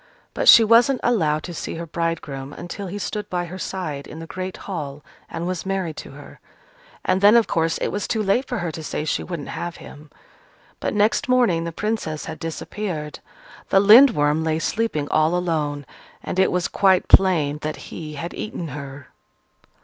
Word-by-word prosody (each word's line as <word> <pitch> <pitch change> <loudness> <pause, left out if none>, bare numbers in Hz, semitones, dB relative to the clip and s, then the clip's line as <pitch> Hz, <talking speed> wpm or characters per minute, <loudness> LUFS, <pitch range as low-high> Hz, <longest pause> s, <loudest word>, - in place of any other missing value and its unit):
But - - -2
she 230 - +10
wasn't 235 +4 +4
allowed 155 -10 +1
to 175 - -7
see - - -5
her 170 +1 -5
bridegroom 155 -5 -4
until 195 +3 -7
he 190 +3 -5
stood 210 0 -4
by 175 -1 -2
her 185 +2 -8
side 160 -8 -5
in 155 - -10
the 165 - -7
great 185 +2 -6
hall 150 -7 -6 0.2
and 165 - -5
was 180 -1 -3
married 190 -5 -2
to - - -8
her, - - -13 0.7
and 185 - +1
then, 205 +3 +7
of 235 -2 +5
course, 165 0 0
it - - -2
was 205 - -3
too 220 -2 -1
late 225 +7 +1
for 245 - -3
her 175 -5 -3
to 160 - -7
say 150 0 -4
she - - -1
wouldn't 170 -5 -6
have 175 0 -5
him. 150 0 -13 0.7
But - - -2
next 215 +7 +2
morning 230 -10 +3
the 170 - -3
Princess 185 -5 -3
had 160 -1 -7
disappeared. 165 -1 -5 0.5
The 195 - +5
Lindworm 200 - +6
lay 160 -1 0
sleeping 165 -4 -1
all 155 +2 +2
alone: 150 -5 -1 0.4
and 185 - -3
it 190 - +4
was 180 -1 0
quite 190 -2 +3
plain 155 -6 +4
that 155 0 -3
he 150 +2 -8
had 170 +4 -5
eaten 175 -6 -5
her. 140 -1 -8
170 Hz, 190 wpm, -22 LUFS, 155-200 Hz, 0.7 s, she